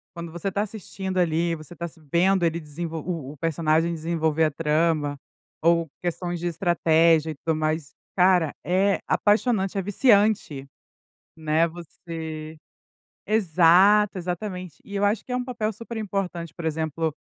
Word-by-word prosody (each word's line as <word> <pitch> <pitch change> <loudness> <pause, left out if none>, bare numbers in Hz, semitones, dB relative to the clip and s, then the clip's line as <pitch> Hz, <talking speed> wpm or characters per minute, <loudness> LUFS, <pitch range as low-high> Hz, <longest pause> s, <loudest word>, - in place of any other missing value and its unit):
quando 170 -1 -7
você 175 +3 -5
está 200 +2 -1
assistindo 195 -2 -5
ali, 170 -1 +1
você 155 +2 -11
está 170 0 -5
se 165 0 -14
vendo 185 +2 +3
ele 165 0 0
desenvol 160 +1 -6
o 160 -7 -4
o - - -16
personagem 165 +2 +1
desenvolver 160 -1 0
a 155 - 0
trama 150 -1 0 0.4
ou 170 0 +3
questões 175 0 -3
de 175 - -2
estratégia 165 -2 +3
e - - -7
tudo 160 +3 -2
mais, 155 -1 -2 0.2
cara, 180 -4 +4
é 195 +3 +2
apaixonante, 205 -2 +1
é - - +1
viciante, 205 - +2 0.7
né, 160 +1 +2
você 160 -2 -8 0.7
exato, 195 +1 +4
exatamente. 180 -1 -5
E 205 - -9
eu 200 - 0
acho 210 +2 +1
que - - -8
é - - 0
um 250 - -1
papel 230 -4 -2
super 230 +2 -8
importante, 185 -6 -3
por 170 - -7
exemplo, 160 0 -1
170 Hz, 155 wpm, -24 LUFS, 160-190 Hz, 0.7 s, cara